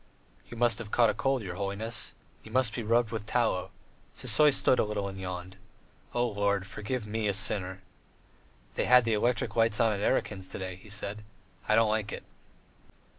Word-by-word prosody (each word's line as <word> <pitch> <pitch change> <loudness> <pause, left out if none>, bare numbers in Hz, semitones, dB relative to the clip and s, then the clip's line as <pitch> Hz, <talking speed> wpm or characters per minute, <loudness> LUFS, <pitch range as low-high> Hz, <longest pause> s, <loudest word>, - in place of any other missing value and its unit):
"You 120 - -9
must 120 -1 +3
have 115 -3 -7
caught 115 -1 +3
cold, 135 -3 0
your 90 -2 -6
holiness. 105 +3 -3 0.3
You - - -13
must 130 -4 +2
be 120 - -3
rubbed 115 0 +2
with 110 -2 -4
tallow." 110 -6 0 0.5
Sisoy 150 -1 +4
stood 130 - +4
a - - +4
little 105 -2 -2
and 95 -1 -7
yawned. 90 0 -6 0.6
"O 120 0 +2
Lord, 100 -3 0
forgive 110 +4 -4
me, 110 0 -2
a 100 - +1
sinner." 95 -2 -1 0.9
"They - - -1
had 125 -1 +6
the 115 - +1
electric 120 +3 0
lights 115 -2 +3
on 115 -2 +4
at 100 - -3
Erakin's 95 -2 0
today," 95 -1 -5
he 105 - -16
said; 105 +1 -5 0.5
"I 110 - +5
don't 115 -1 +4
like 105 -1 -1
it!" - - -6
105 Hz, 180 wpm, -29 LUFS, 100-115 Hz, 0.9 s, had